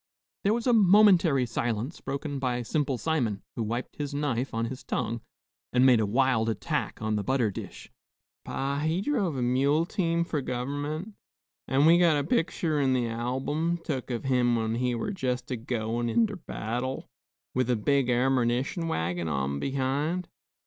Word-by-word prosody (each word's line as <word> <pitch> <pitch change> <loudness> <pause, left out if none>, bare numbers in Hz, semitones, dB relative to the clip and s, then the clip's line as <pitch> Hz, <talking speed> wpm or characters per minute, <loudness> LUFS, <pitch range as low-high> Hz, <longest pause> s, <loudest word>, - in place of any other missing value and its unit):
There 205 - +3
was 235 - -3
a 245 - +4
momentary 190 - +5
silence, 115 +4 -3
broken 140 +1 -4
by 125 -2 -1
Simple 140 +1 -1
Simon, 120 -10 -1
who - - -3
wiped 115 +3 -3
his 145 -1 -4
knife 135 -3 -1
on 115 +1 -1
his 130 +3 -6
tongue, 115 0 -2 0.5
and 125 +1 +4
made 125 -3 +6
a 110 - +1
wild 120 0 +2
attack 110 - -2
on 110 -1 0
the 105 - -1
butter 125 -4 +1
dish. - - -9 0.5
"Pa, 140 +1 -2
he 160 +4 0
druv 200 - 0
a 125 - 0
mule 140 +6 +2
team 170 -3 0
for 155 -4 -2
gov'ment; 145 - -3 0.5
an' 135 +2 +3
we 170 +2 +7
got 170 -4 +4
a 145 - 0
picter 165 - 0
in 135 -1 +2
the 120 -2 0
album, 135 +8 -1
tuk 145 -7 -4
of 120 -2 -3
him 125 -2 +2
when 110 -1 -1
he 125 +1 0
were 160 - -2
just 130 -9 -3
a - - 0
goin' 115 0 -2
inter 210 - +1
battle, 125 +5 -3 0.5
with 130 -1 0
a 125 - +3
big 135 +3 +1
ammernition 130 +5 +1
wagin 85 - -1
on 70 -2 -1
behind. 140 - -1
130 Hz, 170 wpm, -28 LUFS, 120-155 Hz, 0.5 s, we